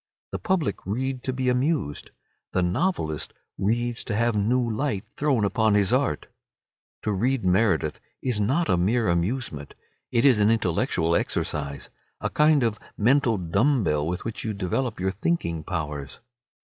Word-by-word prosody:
The - - -3
public 185 - -1
read 130 +5 -2
to 130 - 0
be 130 0 -2
amused. 125 - 0 0.4
The 95 - +2
novelist 90 - -1 0.3
reads 120 +4 0
to 105 - -2
have 115 +1 +1
new 120 +4 +2
light 110 -3 -2
thrown 135 -8 +1
upon 110 0 +2
his 105 +2 +3
art. 130 - +1 0.8
To 105 - 0
read 115 +3 0
Meredith 90 -5 +2 0.2
is 125 -5 -1
not 135 +12 +1
a 90 - +3
mere 110 +6 +2
amusement; 85 - -2 0.4
it 115 +3 +2
is 130 -6 +6
an 105 +1 +4
intellectual 85 -5 +1
exercise, 70 -2 -2 0.3
a - - -2
kind 150 -2 +4
of 110 -2 0 0.2
mental 120 0 +3
dumb 105 - +2
bell 75 -2 0
with 90 +2 -3
which 115 -1 -3
you 110 -2 -3
develop 105 +5 -2
your 95 +1 0
thinking 95 - -1
powers. 75 -5 -4
110 Hz, 155 wpm, -25 LUFS, 90-130 Hz, 0.8 s, is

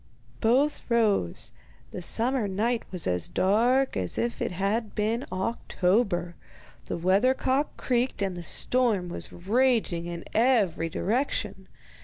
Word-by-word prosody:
Both 265 +6 +2
rose. 215 - +1 0.4
The 180 - -6
summer 235 +5 +1
night 225 +5 0
was 180 -4 -2
as 90 -1 -1
dark 240 +8 +2
as 90 -2 -1
if 235 0 -2
it - - 0
had 200 +5 -2
been 225 +4 -1
October, 185 -2 0 0.5
the - - -3
weather 195 +9 +3
cock 270 +4 -1
creaked, 245 -4 0
and 190 -2 -2
the 175 - -6
storm 215 0 +1
was - - -5
raging 210 -4 +1
in 170 -1 -6
every 215 -9 +2
direction. 235 - -2
215 Hz, 130 wpm, -27 LUFS, 180-245 Hz, 0.5 s, weather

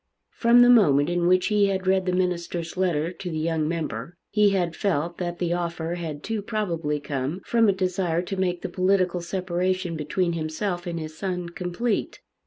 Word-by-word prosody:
From 240 +1 +5
the 245 - +6
moment 155 - +5
in 175 0 +1
which 185 0 +4
he 205 -1 +3
had 190 -1 -1
read 190 0 +2
the - - +2
minister's 175 -2 -2
letter 175 -3 0
to 180 0 -6
the 160 - -3
young 160 -1 0
member, 155 -2 -4
he 210 -1 +4
had 180 -4 0
felt 170 -3 -1
that 175 -1 -3
the 175 -1 0
offer 170 -1 -2
had 160 -4 -5
too 220 -1 -2
probably 170 -9 -2
come 140 +3 -3
from 230 -2 +3
a - - +6
desire 185 -3 0
to 195 - -4
make 180 -2 -1
the - - -1
political 185 -1 +1
separation 185 0 -1
between 170 +3 -1
himself 175 +3 -3
and 170 -1 -3
his 155 0 -7
son 180 -1 -3
complete. 180 +6 -2
175 Hz, 190 wpm, -25 LUFS, 165-190 Hz, -, the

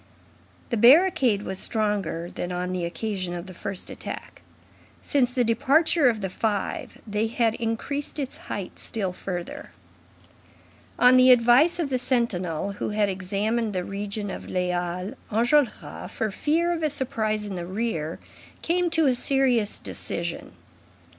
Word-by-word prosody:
The 235 - +1
barricade 250 - +5
was 190 0 -4
stronger 205 -6 -1
than 175 - -4
on 180 0 -2
the 180 -2 -2
occasion 185 -1 -3
of 175 0 -6
the 185 - -10
first 195 +1 -5
attack. - - -8 0.6
Since 255 -4 +2
the 250 -1 +1
departure 280 +6 +3
of 220 -3 -2
the 190 - -2
five, 205 0 -2
they 210 +1 -1
had 230 0 +1
increased 235 +7 -3
its 275 -3 -4
height 195 -3 -5
still 195 -5 -3
further. 180 -1 -6 1.3
On 250 +1 +7
the 255 0 +7
advice 250 +7 +6
of 320 -6 -2
the 255 - +1
sentinel 200 - -1
who 200 - -4
had 210 -1 +1
examined 205 +4 -1
the 180 -1 -1
region 200 +1 -4
of - - -7
the 180 0 -1
Halles, 180 +4 -2 0.2
Enjolras, 240 +4 +1
for 220 -2 -2
fear 330 - +1
of 330 - -3
a 310 - +1
surprise 215 -6 0
in 205 - -5
the 175 -2 -5
rear, 185 -6 -2 0.5
came 350 +1 +1
to 325 -1 +2
a 265 - +4
serious 245 -4 +2
decision. 170 0 -4
220 Hz, 150 wpm, -25 LUFS, 190-255 Hz, 1.3 s, On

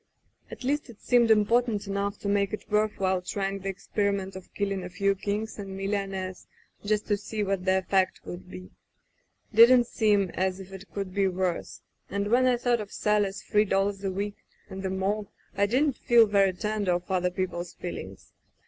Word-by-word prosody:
'^At - - -9
least 285 +2 -1
it 225 - -13
seemed 240 -2 +3
important 220 0 +3
enough 200 +1 -2
to - - -4
make 200 0 +1
it 215 - -6
worth 210 0 +2
while 190 -1 +1
trying 195 +1 -3
the 195 0 -4
experiment 195 0 -2
of 190 -1 -10
killing 195 -2 -1
a 180 - -6
few 200 +2 +1
kings 205 +3 -3
and 195 -1 -6
millionaires 195 -2 -3 0.4
just 210 0 0
to 205 - +1
see 210 +1 -3
what 195 -2 -1
the 190 0 +3
effect 190 0 +1
would 175 - -8
be. 90 0 -10 0.8
Didn't 240 +3 +8
seem 210 -5 +2
as 185 0 -1
if 195 0 -10
it 195 +1 -10
could 195 -2 -4
be 200 0 +2
worse 185 -2 -2
— - - -45
and 200 +2 -2
when 255 +2 +5
I 250 -1 +3
thought 240 -1 +1
of 205 - -8
Sally's 205 -2 0
three 210 0 +2
dollars 195 0 0
a 195 - 0
week, 200 +2 -3 0.3
and 190 0 -6
the 190 - -2
morgue, 195 +2 -1 0.3
I 200 0 +2
didn't 260 +4 +1
feel 235 -1 +5
very 200 -2 +3
tender 210 -1 -1
of 175 +2 -3
other 180 -1 +2
people's 180 -1 -4
feelings. 95 - -8
200 Hz, 195 wpm, -27 LUFS, 190-210 Hz, 0.8 s, Didn't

